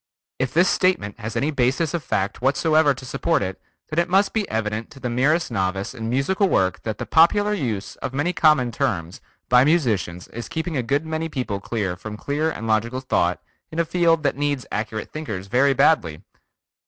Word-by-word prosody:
If 130 -1 0
this 175 +3 +4
statement 175 - +1
has 110 0 -5
any 150 +3 0
basis 140 +3 +1
of 170 -3 -2
fact 100 -5 -2
whatsoever 145 +2 +3
to 130 - -10
support 165 +1 0
it 95 0 -5 0.3
then 155 - +1
it 170 - +1
must 195 +2 +3
be 215 -3 -1
evident 110 0 -2
to 140 - -14
the 125 -2 -3
merest 145 +6 +1
novice 95 0 -2
in 115 -3 -5
musical 185 - +1
work 95 - +1
that 110 -2 -4
the - - -4
popular 205 +6 +4
use 115 - -3
of - - -4
many 145 +7 -1
common 150 -8 +3
terms 85 -5 -2 0.3
by 125 0 +6
musicians 110 - 0
is 120 +1 -7
keeping 165 0 -3
a 130 - +1
good 140 +6 0
many 160 +1 -3
people 125 -9 -3 0.4
from 105 +1 -7
clear 150 +6 -1
and 115 -8 -5
logical 115 +3 0
thought 90 -9 0 0.3
in 160 - -7
a 170 - +2
field 165 -1 +2
that 140 - +1
needs 145 -2 -1
accurate 110 0 -4
thinkers 105 -12 -5
very 130 +7 +3
badly! 90 - +2
135 Hz, 190 wpm, -22 LUFS, 110-160 Hz, 0.4 s, by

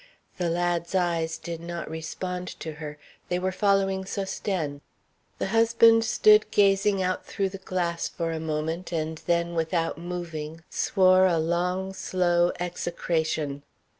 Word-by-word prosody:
The 175 -2 +1
lad's 175 +1 -1
eyes 165 -3 0
did 170 0 -6
not 170 0 -5
respond 180 +3 -5
to 160 - -5
her; 150 -1 -6 0.3
they 180 - +1
were 185 +1 -1
following 195 -1 +2
Sosthène. 190 -6 -3 0.6
The - - -2
husband 230 +1 +5
stood 215 -1 +5
gazing 195 -1 +3
out 185 0 -1
through 195 -1 -2
the 195 0 -8
glass 175 -3 -2
for 165 -1 -3
a 160 - -3
moment, 160 +3 -3
and 160 -1 -2
then, 170 0 +1
without 165 0 -1
moving, 165 -2 -6
swore 185 0 +4
a 170 -2 +2
long, 180 +4 -1
slow 175 -2 +1
execration. 160 -4 -2
175 Hz, 135 wpm, -26 LUFS, 165-190 Hz, 0.6 s, husband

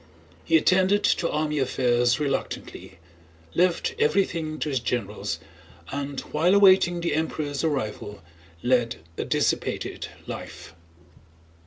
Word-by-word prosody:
He 165 - +4
attended 190 +5 +3
to 170 - +2
army 150 0 -1
affairs 125 -1 +2
reluctantly, 140 -2 -4 0.6
left 180 -1 +1
everything 160 -1 +1
to 155 - -2
his 135 -3 0
generals, 115 -3 -3 0.5
and 140 -1 -4
while 170 +6 +2
awaiting 185 -3 +5
the 170 - 0
Emperor's 150 -2 -2
arrival 105 - -3 0.4
led 120 -2 +2 0.2
a - - -3
dissipated - - -1 0.2
life. - - -8
150 Hz, 110 wpm, -25 LUFS, 125-170 Hz, 0.6 s, awaiting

